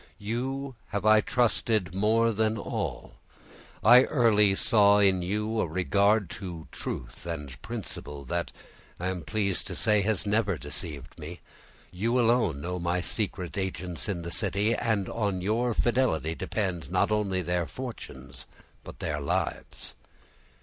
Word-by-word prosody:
You 130 +6 -3
have 100 0 -3
I 110 0 +7
trusted 110 -6 +1
more 110 +4 +3
than 110 +1 0
all; - - -4 0.7
I 125 +4 +8
early 105 -7 +4
saw 105 -2 +5
in 95 -3 +4
you 105 +5 -1
a - - 0
regard 100 +4 +2
to 85 -4 -7
truth - - -6
and 75 -6 -6
principle, 70 -1 -6
that, - - -2 0.5
I 90 +2 -1
am 95 -2 -3
pleased 100 -1 -1
to - - -5
say, 105 -2 +3
has 105 0 +1
never 105 -3 +1
deceived 75 0 -6
me—you 90 +7 -5
alone 115 - +2
know 90 +2 -3
my 85 +1 0
secret 95 -2 -2
agents 90 0 -4
in 85 -4 -2
the 85 - -5
city, 100 +5 +1
and 110 -5 0
on 100 -5 -1
your 110 +5 0
fidelity 115 - +1
depend, 90 -5 -3
not 90 +3 +2
only 100 -3 0
their 90 0 -1
fortunes, 130 -2 -8 0.4
but - - -10
their 75 -2 -2
lives." 70 - -3
100 Hz, 140 wpm, -28 LUFS, 85-110 Hz, 0.7 s, I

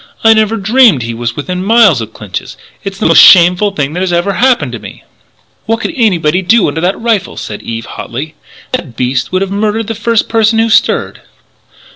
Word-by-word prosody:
I 225 0 +6
never 220 0 +1
dreamed 220 - +3
he 115 0 -5
was 120 0 -4
within 180 +5 -4
miles 205 - +4
of 110 0 -7
Clinch's! 105 -5 -8 0.3
It's 195 -1 -6
the 215 - -3
most - - +6
shameful 180 +3 +6
thing 145 0 -2
that 180 +1 -2
ever 175 +3 0
happened 250 +5 +1
to - - -7
me - - -12 0.3
" - - -40
"What 225 +1 -1
could 330 - -4
anybody 185 - +1
do 195 +4 +2
under 150 +2 -3
that 180 +3 -1
rifle?" 225 -4 -2
said 105 - -7
Eve 115 0 -6
hotly. 140 +9 -7 0.4
"That 170 - -5
beast 125 0 -2
would 185 +1 0
have 195 - -6
murdered 215 +2 -1
the 225 - -4
first 225 +1 -1
person 225 0 +1
who 225 0 +1
stirred!" - - 0
195 Hz, 200 wpm, -11 LUFS, 150-225 Hz, 0.4 s, I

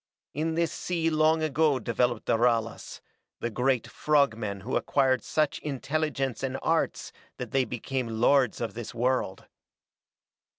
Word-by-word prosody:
In 160 +3 -1
this 170 0 +1
sea 165 -2 -1
long 155 +1 +3
ago 155 -1 +2
developed 120 0 0
the - - +2
Ralas, 115 -1 0 0.4
the 120 - -3
great 125 +1 +1
frog 145 -5 +2
men 100 -3 -4
who 120 +7 -3
acquired 130 -3 +2
such 155 -2 0
intelligence 140 -2 -2
and 135 0 -2
arts - - 0 0.2
that 125 -3 -6
they 135 -1 +2
became 125 +2 -3
lords 130 -1 +3
of 115 -4 -3
this 120 +1 -7
world. 120 -5 -1
130 Hz, 140 wpm, -28 LUFS, 120-150 Hz, 0.4 s, long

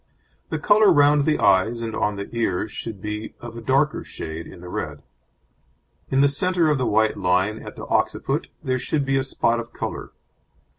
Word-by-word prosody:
The - - -1
colour 210 -2 +5
round 145 -2 +5
the 155 - +2
eyes 110 +5 +3
and 110 -1 -4
on 105 -1 0
the 100 0 -5
ears 110 -3 -1
should 110 -3 -7
be 105 +1 -5
of 120 -1 -9
a 115 - -7
darker 135 +5 +1
shade 80 +1 -7
in - - -12
the 90 - -9
red; 75 -4 -5 1.1
in 135 - +3
the 140 - +6
centre 165 +3 +2
of 145 - +1
the 125 - 0
white 110 +1 +2
line 95 +4 +1
at - - -9
the - - -7
occiput - - 0 0.2
there 130 0 0
should 140 +3 -1
be 135 0 +1
a - - 0
spot 120 -3 0
of 115 0 -8
colour. - - -5
115 Hz, 195 wpm, -23 LUFS, 105-140 Hz, 1.1 s, the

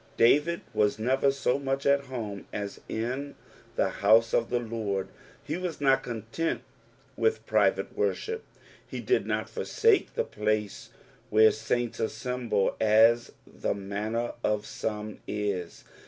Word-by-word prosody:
David 150 +8 +4
was 105 0 +2
never 130 +5 +2
so 135 -1 0
much 135 0 -2
at 140 0 +3
home 110 -7 -6
as 100 -1 -5
in 130 +6 -3 0.4
the - - +2
house 110 +3 +4
of 115 - +2
the 125 - +1
Lord; 110 -5 -3 0.3
he 155 - -3
was 180 -3 -4
not 135 -2 +4
content 120 +7 -3 0.5
with 450 0 +1
private - - +2
worship; 455 0 -1 0.4
he - - -7
did 390 - +1
not - - -1
forsake 445 -3 +1
the 475 - +1
place 105 - -2 0.4
where 110 +1 +6
saints 115 +2 -2
assemble, 115 -2 -1
as 115 +2 +5
the - - -3
manner 105 +4 -2
of 105 -1 0
some 105 -1 -4
ia. 100 -4 -1
115 Hz, 135 wpm, -28 LUFS, 105-135 Hz, 0.5 s, where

